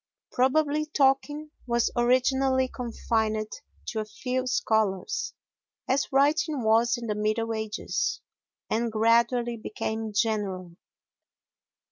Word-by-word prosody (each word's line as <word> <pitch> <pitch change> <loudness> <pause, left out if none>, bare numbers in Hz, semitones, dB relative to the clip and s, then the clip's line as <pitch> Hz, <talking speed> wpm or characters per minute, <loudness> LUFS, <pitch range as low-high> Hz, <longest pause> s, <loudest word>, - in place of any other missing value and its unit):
Probably 295 +4 +2
talking 290 +1 +1 0.2
was 235 -1 +1
originally 260 +2 +3
confined 220 -3 -2 0.4
to 220 - -3
a 215 - -2
few 255 +4 -3
scholars, 220 - 0 0.5
as 270 +2 0
writing 290 0 +2
was 230 +2 +3
in 240 - -6
the 215 - -1
middle 215 +2 -1
ages, 220 +1 -2 0.5
and 230 +1 0
gradually 235 +2 +2
became 220 0 -4
general. 200 -5 -1
235 Hz, 100 wpm, -27 LUFS, 220-265 Hz, 0.5 s, originally